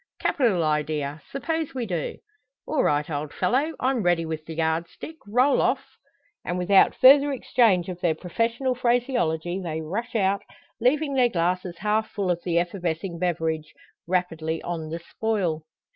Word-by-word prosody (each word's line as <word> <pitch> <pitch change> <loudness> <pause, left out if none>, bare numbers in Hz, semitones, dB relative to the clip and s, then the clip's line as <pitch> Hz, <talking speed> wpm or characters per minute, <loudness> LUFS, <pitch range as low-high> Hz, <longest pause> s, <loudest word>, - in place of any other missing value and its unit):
"Capital 220 - +2
idea! 150 -1 -1
Suppose 320 +1 -3
we 250 -2 -2
do?" 175 -7 -3 0.5
"All 305 - 0
right, 145 0 +1
old 150 -1 -4
fellow! 270 - 0
I'm 255 -2 +1
ready 175 -3 +2
with 160 -1 -4
the 160 - -6
yard 160 +1 0
stick 320 - -10
roll 250 +7 +3
off!" - - +1 0.6
And 175 - -2
without 190 +2 +4
further 280 +2 +7
exchange 230 -8 +2
of 180 -1 -6
their 165 -3 +2
professional 230 - -1
phraseology, 235 -9 0
they 160 -3 -3
rush 195 +11 -4
out, 200 -1 +2 0.4
leaving 280 +5 +2
their 255 -2 +4
glasses 180 -2 -1
half 215 +3 0
full 195 -4 -1
of 175 -1 -2
the 170 -2 0
effervescing 175 0 -2
beverage 160 -3 -2 0.3
rapidly 165 -3 -1
on 165 -2 -4
the 165 - -3
spoil. 170 -4 -2
180 Hz, 155 wpm, -25 LUFS, 160-235 Hz, 0.6 s, further